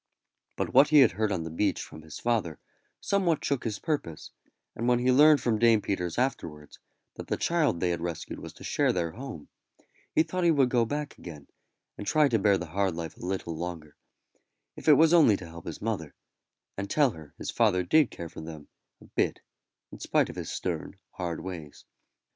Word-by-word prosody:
But - - -3
what 135 +3 +7
he 150 -1 +6
had 130 - +6
heard 105 +3 -1
on 90 -4 -1
the 80 - -6
beach 100 +6 0
from 80 - -9
his 80 -1 -10
father 110 -11 -1 0.4
somewhat 185 -6 0
shook 140 -3 -1
his 105 -3 -2
purpose, 140 - -4 0.4
and 115 - -2
when 125 0 +4
he 125 +1 +2
learned 145 +1 +6
from 115 -4 0
Dame 115 -1 +5
Peters 90 -5 -3
afterwards, 80 - -3 0.4
that - - -7
the - - -1
child 155 - +1
they 90 0 +1
had 85 -1 -3
rescued 85 -2 -5
was - - -8
to - - -14
share - - +1
their 85 -2 -1
home, 125 - -8 0.7
he 160 - +5
thought 180 +3 -3
he 170 - +5
would 140 -5 +3
go 120 -2 +2
back 145 +3 -4
again, 75 -5 -10 0.5
and 105 - -6
try 155 +4 +4
to 115 -3 +2
bear 100 -1 +3
the 90 - -5
hard 95 -3 0
life 80 -2 -6
a - - -13
little 90 -2 -3
longer, 80 -3 -6 0.8
if - - -11
it 155 - +9
was 160 +3 +5
only 145 - +6
to 90 - -9
help 85 0 -11
his 85 - -7
mother, 100 -10 -3 0.6
and 100 0 -5
tell 145 0 +3
her 80 -4 -13
his - - -5
father 100 -6 +2
did 145 - +4
care 85 - -7
for 80 - -10
them 80 -2 -9 0.3
a - - -15
bit - - -1 0.5
in - - -11
spite - - +1
of - - -14
his - - -5
stern, - - -4 0.2
hard 85 -3 -4
ways. 85 -6 -8
100 Hz, 205 wpm, -28 LUFS, 85-135 Hz, 0.8 s, it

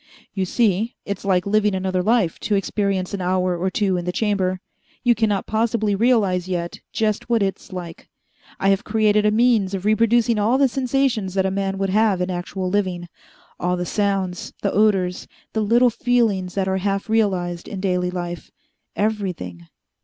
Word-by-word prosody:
"You 190 -2 -1
see, 220 +2 +1
it's 200 -1 -4
like 185 -2 +2
living 210 0 +2
another 185 -1 -1
life 215 -4 +1
to 210 - 0
experience 195 -1 -1
an 200 - -3
hour 180 0 +1
or 180 +2 -1
two 190 -1 0
in 175 - -4
the 180 - -1
Chamber. 190 -2 0 0.4
You 240 -2 +5
cannot 210 -4 0
possibly 220 -1 0
realize 200 -5 +2
yet 175 -2 -3
just 215 +1 -1
what 230 -3 +3
it's 195 -1 -4
like. 175 -3 -8 0.5
I 195 - +2
have 195 0 +2
created 210 -1 +2
a - - +3
means 215 -4 +2
of 190 0 -5
reproducing 230 +1 +3
all 225 +5 +3
the 275 0 +4
sensations 255 -6 0
that 190 -1 +2
a 190 - 0
man 195 0 -2
would 195 -1 -1
have 210 -2 +3
in 180 +1 -1
actual 185 +1 -4
living; 180 -3 -1 0.5
all 180 +1 0
the 180 - -2
sounds, 195 -3 -1
the 200 - +1
odors, 195 -4 +1 0.3
the 220 - 0
little 235 +3 +4
feelings 225 -6 0
that 195 -1 0
are 190 0 0
half 195 +3 -1
realized 185 -6 0
in 200 - -6
daily 180 -2 0
life 175 -1 -5 0.5
everything. 180 - -3
195 Hz, 175 wpm, -22 LUFS, 185-215 Hz, 0.5 s, You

